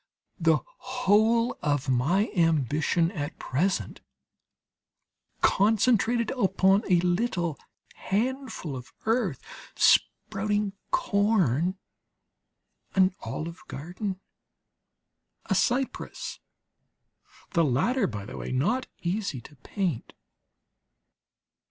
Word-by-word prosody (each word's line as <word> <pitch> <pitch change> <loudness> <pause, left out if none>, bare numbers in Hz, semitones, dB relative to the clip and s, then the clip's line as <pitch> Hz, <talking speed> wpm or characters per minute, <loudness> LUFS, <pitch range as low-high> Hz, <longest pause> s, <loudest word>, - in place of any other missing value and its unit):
The - - +4 0.2
whole 230 -1 +2
of 145 -2 0
my 150 - +2
ambition 165 +1 +2
is 160 - -5
at 145 +2 -5
present 180 +9 -1 1.4
concentrated 225 +2 +3
upon 195 -4 +3
a 175 - +6
little 175 - 0 0.3
handful 235 - -2
of 125 -1 -9
earth, 220 - +1 0.4
sprouting 205 0 +2 0.2
corn, 200 - +2 1.2
an 190 -1 +4
olive 165 +2 -5
garden, 185 +6 -5 1.3
a - - 0
cypress 260 +2 -1 1.1
(the 170 -3 +3
latter, 195 - +2
by 105 -3 -6
the - - -8
way, - - -5
not 210 - 0 0.2
easy 180 - -2
to 145 - -15
paint). 175 - -3
190 Hz, 85 wpm, -27 LUFS, 155-220 Hz, 1.4 s, a